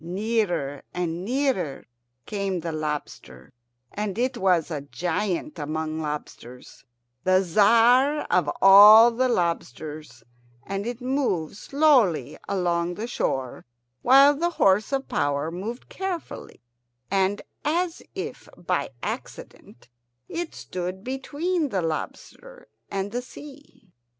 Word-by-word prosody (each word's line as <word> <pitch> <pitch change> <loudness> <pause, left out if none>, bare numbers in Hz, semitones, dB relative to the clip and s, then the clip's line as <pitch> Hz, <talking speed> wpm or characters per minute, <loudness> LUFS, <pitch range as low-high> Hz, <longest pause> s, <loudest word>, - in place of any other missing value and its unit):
Nearer 180 -6 -1
and 175 -1 -3
nearer 240 - -1 0.4
came 195 -4 -3
the 165 0 -4
lobster, 150 - -6 0.4
and 210 -1 -3
it 250 +2 0
was 180 -6 +1
a 150 -3 -3
giant 180 - -3
among 155 +1 -3
lobsters, 150 -5 -8 0.4
the 185 0 +4
Tzar 235 - +4
of 175 -5 +2
all 210 +4 +9
the 255 +2 0
lobsters; 155 - -3 0.4
and 195 +2 -4
it 240 +1 -5
moved 250 - -1
slowly 275 - +2
along 175 -2 0
the 215 - -4
shore, 135 - -3 0.4
while 275 +3 +7
the 340 +4 0
horse 195 +4 +3
of 275 0 -1
power 145 +2 -1
moved 210 +8 -6
carefully 365 - -6 0.5
and 195 +1 +1 0.2
as 335 +3 -1
if - - -6
by 155 -4 -2
accident, 120 +2 -8 0.4
until 340 - -3
it - - -20
stood 185 +1 -6
between 290 +6 -2
the 190 -6 -1
lobster - - -6 0.2
and 195 0 -3
the 245 +2 -2
sea. 275 -7 -14
195 Hz, 115 wpm, -25 LUFS, 165-255 Hz, 0.5 s, all